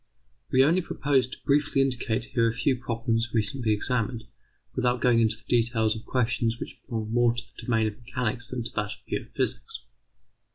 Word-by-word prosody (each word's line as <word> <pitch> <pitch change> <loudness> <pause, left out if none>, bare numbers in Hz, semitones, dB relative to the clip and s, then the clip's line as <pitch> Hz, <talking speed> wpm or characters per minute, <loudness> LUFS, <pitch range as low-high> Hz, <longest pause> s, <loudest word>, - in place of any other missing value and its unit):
We 130 +1 +5
only 165 +6 +4
propose 140 -6 +1
to 130 - -9
briefly 145 0 +2
indicate 120 -4 -1
here 125 -3 +1
a - - -2
few 130 +3 +2
problems 115 -1 -1
recently 115 +1 +1
examined, 115 +1 0 0.5
without 125 -1 +1
going 120 -1 +4
into 110 -1 +2
the 110 - -15
details 115 -2 +2
of 110 - -8
questions 120 -2 +1
which - - -7
belong 110 -3 -3
more 120 -1 +3
to 120 - -3
the - - -8
domain 115 -3 +2
of 110 0 -3
mechanics 125 0 -1
than 130 -2 -4
to 115 - -6
that 105 0 -1
of - - -18
pure - - -2
physics. - - -2
120 Hz, 190 wpm, -27 LUFS, 115-130 Hz, 0.5 s, We